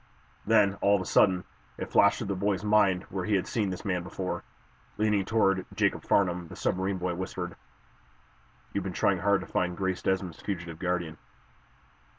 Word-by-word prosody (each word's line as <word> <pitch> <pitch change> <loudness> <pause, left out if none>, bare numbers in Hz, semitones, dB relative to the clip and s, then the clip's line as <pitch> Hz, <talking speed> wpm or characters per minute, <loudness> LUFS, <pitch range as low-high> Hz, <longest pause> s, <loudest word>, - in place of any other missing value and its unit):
Then, 105 -3 +4
all 100 0 +5
of 100 - 0
a - - -10
sudden, 90 -2 +3 0.3
it - - -6
flashed 100 0 +5
through 115 - -4
the 100 -1 -2
boy's 100 +1 0
mind 105 -3 +3
where 95 -1 -2
he 105 - +2
had 95 - +1
seen 105 -4 -1
this 90 - -6
man 90 -3 0
before. 90 +1 -4 0.5
Leaning 105 -2 +2
toward 95 -4 +2
Jacob - - +1
Farnum, 90 -3 +1
the - - -10
submarine 95 +1 -1
boy 90 0 -2
whispered: 90 0 -5 1.2
"You've 100 - -1
been 95 -1 -4
trying 95 +1 +2
hard 100 +1 +2
to - - -7
find 90 -1 -1
Grace 95 -2 -1
Desmond's 95 -4 -1
fugitive 85 -5 -5
guardian." 90 -3 -2
95 Hz, 175 wpm, -28 LUFS, 90-100 Hz, 1.2 s, all